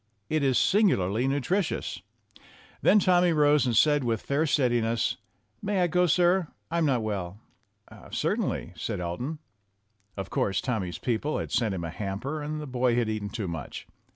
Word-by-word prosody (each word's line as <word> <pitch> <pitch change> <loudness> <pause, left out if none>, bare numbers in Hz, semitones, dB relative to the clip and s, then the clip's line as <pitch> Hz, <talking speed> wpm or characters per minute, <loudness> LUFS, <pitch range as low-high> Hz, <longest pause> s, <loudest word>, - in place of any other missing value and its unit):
It 155 -1 +2
is 135 -3 +2
singularly 125 - +2
nutritious. 160 +7 -1 0.8
Then - - +5
Tommy 180 -3 +4
rose 150 -2 +4
and 115 -3 +1
said 145 -2 +4
with 115 -3 -1
fair 150 +3 0
steadiness: 120 -6 +1 0.4
"May 200 -2 0
I - - +4
go, 180 +1 +2
sir? 175 +1 +3 0.2
I'm 165 -2 +2
not 125 -5 +1
well." 100 -3 -4 0.7
"Certainly," - - -2
said - - -4
Elton. 90 - -4 0.8
Of 95 -1 -5
course, 95 -1 0
Tommy's 95 -9 -2
peo 115 +4 -1
ple 150 +5 -2
had - - -4
sent 110 -5 +1
him 85 - -4
a 85 - -4
hamper, 105 - -4
and 150 +1 -4
the 150 - -5
boy 125 -2 +1
had 120 -2 +1
eaten 105 -2 -3
too 105 -3 -4
much. 80 -5 -6
130 Hz, 165 wpm, -27 LUFS, 105-155 Hz, 0.8 s, Then